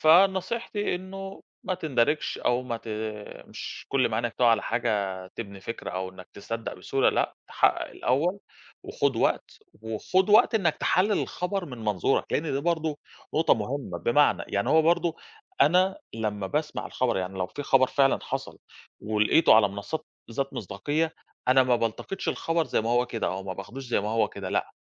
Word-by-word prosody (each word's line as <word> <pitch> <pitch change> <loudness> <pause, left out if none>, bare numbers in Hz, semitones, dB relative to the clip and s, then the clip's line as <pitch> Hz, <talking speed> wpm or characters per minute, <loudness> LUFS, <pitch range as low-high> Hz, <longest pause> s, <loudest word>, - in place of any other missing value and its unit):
فنصيحتي 195 +6 +3
إنه 195 +1 -7 0.2
"ما 185 - 0
تِندَرِجش، 150 -3 0
أو 125 +1 +1
ما 120 -2 -3
ت 115 - -12 0.6
مش - - -8
كل 135 -2 +2
ما 110 - -2
عَيْنَك 120 +1 -1
تُقَع 120 - +4
على 115 - +3
حاجة 100 -5 -1
تبني 100 0 -8
فِكْرة 115 +4 -6
أو 95 +1 -3
إنك 95 0 -13
تصدق 115 +3 -5
بسهولة. 135 -1 +1
لأ، - - 0
تَحَقَّق - - +2
الأول 165 +10 0 0.4
وخُد - - 0
وقت، - - 0 0.2
وخُد 185 - 0
وقت 225 +3 +6
إنك 175 -8 +2
تحَلِّل 200 +3 +2
الخَبَر 185 +1 -3
من 125 -7 -8
منظورك." 105 -5 0
لإن - - +2
ده 135 - 0
برضه 160 -2 -1 0.4
نقطة 160 +2 +4
مهمة. 115 -4 -4
بمعنى، 145 +9 +3
يعني 100 0 -1
هو 160 +1 +6
برضه 170 0 +2 0.4
أنا 185 - +4 0.2
لمّا 105 -3 -2
باسمع 150 +8 -2
الخبر، 125 -5 0
يعني 95 +1 -3
لو 90 - 0
في 145 - -7
خبر 135 -1 +4
فعلًا 135 +1 +3
حصل - - -5 0.4
ولقيته 105 +8 +4
على 110 -2 +6
منصات 100 +11 -5 0.2
ذات 135 +4 -2
مصداقية، 145 - -2 0.3
أنا 130 +1 +6
ما 125 -1 +3
بالتقطش 115 - -3
الخبر 165 0 0
زي - - 0
ما 115 +1 -2
هو 120 +1 +3
كده 115 -2 -3
أو 95 +1 -2
ما 95 -1 -4
باخدوش 115 +8 -8
زي 120 - +1
ما 105 - -3
هو 115 +1 +2
كده. - - -6
لأ، - - -1
130 Hz, 175 wpm, -27 LUFS, 110-165 Hz, 0.6 s, وقت